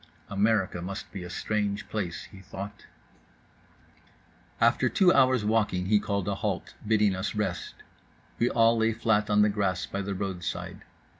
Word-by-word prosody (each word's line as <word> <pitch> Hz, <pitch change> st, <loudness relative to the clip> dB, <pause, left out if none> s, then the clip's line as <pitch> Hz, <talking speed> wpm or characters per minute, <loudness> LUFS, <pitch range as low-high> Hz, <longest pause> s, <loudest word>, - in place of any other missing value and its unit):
America 100 Hz, -3 st, +1 dB
must 95 Hz, +3 st, -6 dB
be 95 Hz, -2 st, -6 dB
a 90 Hz, -, -7 dB
strange 105 Hz, +2 st, -2 dB
place, 95 Hz, -6 st, -3 dB
he 95 Hz, -, -12 dB
thought…. 100 Hz, +2 st, -8 dB, 1.7 s
After -, -, +3 dB
two 185 Hz, -3 st, +4 dB
hours 130 Hz, -4 st, +4 dB
walking 105 Hz, -4 st, +1 dB
he 105 Hz, +2 st, +4 dB
called 100 Hz, -2 st, -2 dB
a 100 Hz, -, +1 dB
halt, 100 Hz, -, -3 dB
bidding 105 Hz, -3 st, +3 dB
us 95 Hz, +4 st, -3 dB
rest. 95 Hz, -4 st, -2 dB, 0.6 s
We 120 Hz, -, +3 dB
all 115 Hz, 0 st, +4 dB
lay 110 Hz, 0 st, +2 dB
flat 110 Hz, -2 st, +1 dB
on 105 Hz, 0 st, +5 dB
the -, -, +5 dB
grass 100 Hz, -3 st, 0 dB
by 100 Hz, -, -4 dB
the 100 Hz, 0 st, -3 dB
roadside. 95 Hz, -2 st, -4 dB
105 Hz, 155 wpm, -28 LUFS, 95-110 Hz, 1.7 s, on